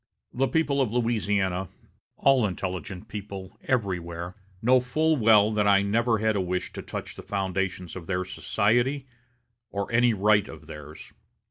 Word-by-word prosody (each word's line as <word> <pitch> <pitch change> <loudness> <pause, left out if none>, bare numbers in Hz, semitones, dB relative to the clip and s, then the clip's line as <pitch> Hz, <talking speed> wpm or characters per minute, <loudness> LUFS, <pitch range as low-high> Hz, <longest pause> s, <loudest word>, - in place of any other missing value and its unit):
The 135 +2 +1
people 145 -3 +1
of 125 -5 0
Louisiana 105 -6 0 0.5
all 130 -5 +4
intelligent 95 0 -5
people 100 -2 -8
everywhere 90 -7 -2 0.3
know 125 +4 +5
full 155 +6 +1
well 110 -4 +5
that 105 -1 +1
I 100 -1 +5
never 115 +3 +2
had 110 +1 +1
a 100 - +1
wish 90 0 -2
to - - -6
touch - - -6
the - - -9
foundations 95 -2 -2
of 90 -3 -8
their 90 -1 -1
society, 120 +9 +1 0.6
or 100 +2 -4
any 120 -1 +4
right 105 0 +3
of - - -11
theirs. 75 +1 -11
105 Hz, 150 wpm, -26 LUFS, 95-120 Hz, 0.6 s, know